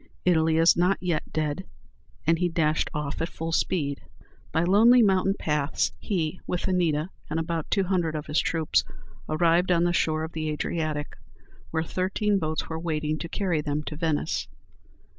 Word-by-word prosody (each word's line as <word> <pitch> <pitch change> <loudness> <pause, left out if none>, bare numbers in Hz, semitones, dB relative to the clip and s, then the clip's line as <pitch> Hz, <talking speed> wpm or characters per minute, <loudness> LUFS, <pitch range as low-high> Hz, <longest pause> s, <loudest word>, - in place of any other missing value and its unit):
Italy 160 -2 +3
is 165 +1 +6
not 180 +3 +2
yet 175 -4 -2
dead!" 155 +3 -2 0.6
and 165 +1 +3
he 180 -1 +1
dashed 160 -2 +1
off 150 0 -3
at 165 - -1
full 165 +1 -5
speed. 150 -5 0 0.5
By 160 - +1
lonely 225 +7 +6
mountain 195 -1 +3
paths, 150 -1 0
he, 180 -3 -2
with 180 - -2
Anita 170 -2 +1 0.2
and 160 - -1
about 165 -1 -3
two 195 - +2
hundred 175 -4 0
of 150 -1 -4
his 150 0 +1
troops, 160 -2 +1 0.5
arrived 170 +3 +3
on 170 -1 +3
the 175 0 +2
shore 155 -2 +1
of 160 - -5
the 155 -1 -3
Adriatic, 150 0 -3 0.5
where 160 0 -1
thirteen 195 +4 0
boats 155 -2 -2
were 160 0 -4
waiting 155 -2 -2
to 170 - -5
carry 180 -6 0
them 150 0 -2
to 150 - -6
Venice. 160 -2 -1
165 Hz, 170 wpm, -26 LUFS, 155-180 Hz, 0.6 s, is